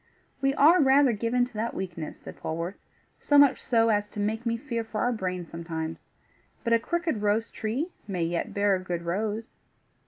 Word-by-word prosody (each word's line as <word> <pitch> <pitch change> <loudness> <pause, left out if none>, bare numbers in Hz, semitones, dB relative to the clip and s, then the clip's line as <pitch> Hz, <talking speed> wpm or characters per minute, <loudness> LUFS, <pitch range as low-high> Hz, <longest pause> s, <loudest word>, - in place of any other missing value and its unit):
"We 275 0 +2
are 320 +6 +6
rather 270 -1 +5
given 235 +3 +1
to 245 - -14
that 225 +2 -3
weakness," 175 -4 -5
said - - -10
Polwarth, 165 +4 -4 0.4
"so 290 - +3
much 285 -2 +6
so 230 -2 +3
as 205 -1 +1
to 210 - -8
make 220 +3 -1
me 230 0 +1
fear 235 -2 -3
for 220 -1 -4
our 245 - +2
brains 180 -5 -3
sometimes. 165 -1 -5 0.6
But 230 -3 +1
a 230 - +5
crooked 330 -3 -1
rose 210 +2 +1
tree 255 +11 -3 0.2
may 185 -4 -1
yet 170 +1 -2
bear 200 0 +2
a - - -2
good 175 -2 -4
rose." 210 +6 -3
220 Hz, 190 wpm, -27 LUFS, 185-245 Hz, 0.6 s, are